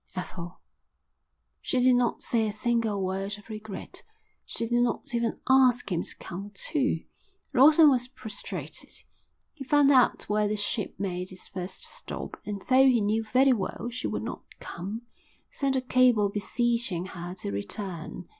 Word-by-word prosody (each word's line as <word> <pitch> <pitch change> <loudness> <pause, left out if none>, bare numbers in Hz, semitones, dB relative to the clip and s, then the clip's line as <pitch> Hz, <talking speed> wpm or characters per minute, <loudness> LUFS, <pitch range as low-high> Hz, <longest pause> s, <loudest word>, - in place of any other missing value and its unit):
_ - - -14
Ethel. 175 0 -7 1.0
She 255 - 0
did 250 0 +5
not 245 -1 +1
say 225 -2 +1
a - - -1
single 220 -2 0
word 195 +2 -2
of 205 - -17
regret. 215 -2 -7 0.4
She 230 - -3
did 240 +1 +2
not 245 0 -1
even 235 -1 0
ask 255 -4 +4
him 170 -1 +1
to - - -5
come 195 +3 -7
too. 275 - 0 0.5
Lawson 300 +4 +8
was 250 -3 +3
prostrated. 220 -5 -6 0.6
He 285 - -8
found 285 +1 +4
out 255 -3 +4
where 210 0 +2
the 210 +1 -1
ship 205 0 -2
made 185 -1 -3
its 185 - -9
first 185 -1 -5
stop - - -6
and, 200 -2 -4
though 265 +1 +5
he 250 -3 +5
knew 215 +2 +1
very 260 +4 +4
well 235 +2 -3
she 250 +2 -3
would - - -3
not - - -5 0.2
come, 200 +7 -6 0.5
sent 275 -1 0
a 260 - +1
cable 250 -5 +4
beseeching 210 -2 0
her 180 -1 -7
to 140 - -5
return. 160 - -4
220 Hz, 165 wpm, -28 LUFS, 195-250 Hz, 1.0 s, Lawson